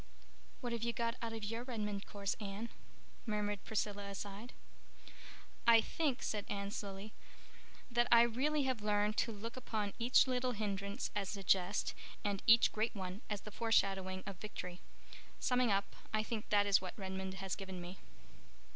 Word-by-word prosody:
"What 245 -2 -2
have 230 - -2
you 235 0 0
got 230 -1 0
out 230 -1 -2
of 225 -1 -5
your 225 +3 -2
Redmond 210 -5 -3
course, 200 -1 -2
Anne?" 210 +2 -4 0.6
murmured 205 -2 -1
Priscilla 205 -2 -2
aside. 200 +4 -6 1.2
"I 230 -1 +9
think," 275 +3 0
said 210 -2 -2
Anne 200 0 -2
slowly, 200 +1 -5 0.8
"that 240 0 +3
I 235 0 +9
really 275 +6 +2
have 260 -4 0
learned 210 0 +2
to 230 - +2
look 225 +2 -6
upon 215 -5 -2
each 240 +2 +6
little 255 -1 0
hindrance 200 +1 -2
as 200 0 -1
a 195 - -6
jest 185 +2 +2 0.3
and 200 -2 0
each 230 0 +8
great 220 +1 0
one 190 +1 -4
as 205 -2 -2
the 210 - -9
foreshadowing 195 -4 +1
of 195 -2 -6
victory. 180 -3 -6 0.6
Summing 250 -1 +3
up, 200 0 0 0.2
I 215 0 +1
think 220 -1 -4
that 205 -1 +5
is 200 -2 +5
what 185 -1 -6
Redmond 190 -1 -4
has 190 0 -3
given 190 -2 -6
me." 175 +2 -7
210 Hz, 165 wpm, -37 LUFS, 195-230 Hz, 1.2 s, I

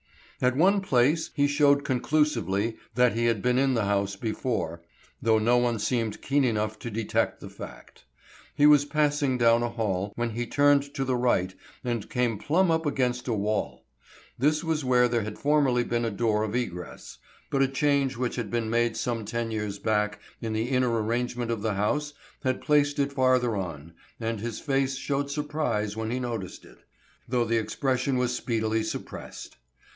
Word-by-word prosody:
At 125 0 +2
one 195 +5 +4
place 150 -1 +2
he 145 - +3
showed 145 0 +3
conclusively 120 - 0 0.2
that 125 -2 +4
he 115 +1 0
had 115 -4 +1
been 125 0 +2
in 135 -1 +2
the 115 -3 +1
house 100 0 0
before, 105 -6 -3 0.4
though 110 -1 +3
no 115 +3 +3
one 120 -1 +1
seemed 110 0 -2
keen 140 +1 +2
enough 110 -3 -1
to 120 - -5
detect 110 0 -1
the - - -9
fact. - - -11 0.5
He 145 - +4
was 150 -1 +7
passing 145 -3 +1
down 115 -1 +4
a 120 - 0
hall, 105 -4 -2
when 120 0 -2
he 120 +2 -3
turned 145 +1 +3
to 135 - -1
the 130 -1 0
right 120 -7 +1 0.3
and 120 -4 -3
came 125 -6 0
plumb 170 - +2
up 160 -1 +1
against 125 -3 -1
a 120 - +1
wall. 105 0 -2 0.5
This 150 +4 +2
was 160 -2 -1
where 125 -1 +4
there 120 -1 0
had 105 0 -6
formerly 140 -4 +2
been 120 0 -1
a - - 0
door 105 0 0
of 110 +1 -2
egress, 90 -8 -5 0.3
but 135 - +2
a 135 - +4
change 140 -1 +1
which 125 -1 -2
had 115 -4 -3
been 115 -1 -1
made 120 -1 +1
some 115 -2 -2
ten 115 +2 -3
years 105 -2 -3
back 105 -1 0 0.2
in 110 -1 -3
the 110 +3 -1
inner 130 -2 +2
arrangement 115 +1 -1
of 115 -3 -2
the 110 -2 -1
house 150 +9 -1 0.3
had 130 -1 0
placed 145 -1 +2
it 140 0 0
farther 130 -3 +2
on, 85 -4 -5 0.3
and 115 -1 -2
his 115 0 -4
face 135 -1 0
showed 140 +1 -2
surprise 145 -8 -2
when 110 0 -3
he 125 +2 -1
noted 115 -7 -3 0.2
it, - - -17 0.5
though 120 -1 +1
the 115 0 +1
expression 130 +4 -1
was 125 0 0
speedily 110 -3 -1
suppressed. 110 - -7
120 Hz, 185 wpm, -27 LUFS, 110-140 Hz, 0.5 s, was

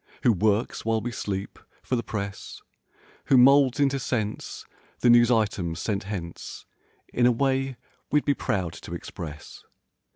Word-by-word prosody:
Who 120 - +5
works 105 +3 0
while 115 0 +1
we 120 +2 -4
sleep, 100 -3 -4 0.2
for 130 - -1
the 120 - 0
press; 100 -3 -6 0.7
Who 135 - +5
moulds 135 +1 +6
into 140 -1 +2
sense, 110 -4 -3 0.4
the 120 - +6
news 120 0 +6
items 100 -8 0
sent 100 0 -2
hence 90 -5 -6 0.5
In 120 0 +4
a - - +5
way 135 +1 0 0.3
we'd 150 0 +2
be 145 - +3
proud 95 -10 -2
to - - -8
express. 75 -2 -8
115 Hz, 150 wpm, -26 LUFS, 100-130 Hz, 0.7 s, moulds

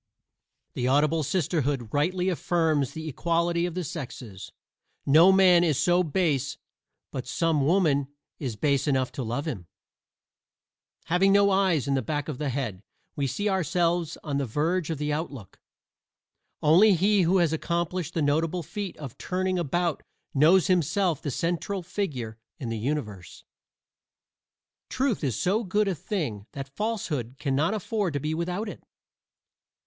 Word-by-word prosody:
The 125 - -1
Audible 150 +4 +3
Sisterhood 145 - -1
rightly 180 +5 +1
affirms 160 -6 0
the 160 0 -6
equality 170 +3 0
of 175 - -7
the 180 - -2
sexes: 125 - -7 0.5
no 160 +7 +7
man 185 -2 +6
is 155 -6 +2
so 175 0 +3
base 150 -5 0 0.5
but 130 -1 -5
some 160 +1 +1
woman 150 -4 +2 0.3
is 125 -6 -3
base 140 +4 +1
enough 130 -3 +1
to 135 - -4
love 120 +6 -3
him. 100 - -5 1.4
Having 190 +3 +3
no 200 0 +5
eyes 190 -7 +2
in 140 - +1
the 135 - +1
back 145 +5 -3
of 150 -5 -5
the 150 -2 -1
head, 120 -8 -3 0.3
we 140 -1 0
see 205 +10 -2
ourselves 175 -3 0
on 145 -3 -2
the 140 - -2
verge 160 +7 0
of 160 - -2
the 150 +1 -1
outlook. 145 - -6 1.0
Only 185 +7 +6
he 200 +3 +3
who 180 +2 +3
has 170 -3 +2
accomplished 170 +1 -2
the 160 - +1
notable 160 +4 +1
feat 200 +2 -6
of 140 -6 -9
turning 185 0 -1
about 170 0 -1 0.3
knows 165 +6 +5
himself 180 -2 +1
the 145 - -3
central 175 +6 -2
figure 140 - -4 0.2
in 130 -7 -5
the 115 -1 -3
universe. 105 -8 -4 1.5
Truth 255 - 0
is 130 -5 0
so 205 +6 +1
good 205 +1 +1
a 195 - +1
thing 145 - -4
that 135 0 -7
falsehood 160 - -2
can 135 -2 -1
not 160 +10 +1
afford 205 -4 -2
to 145 - -1
be 155 +3 -2
without 180 +6 -2
it. - - -8
160 Hz, 155 wpm, -26 LUFS, 140-180 Hz, 1.5 s, no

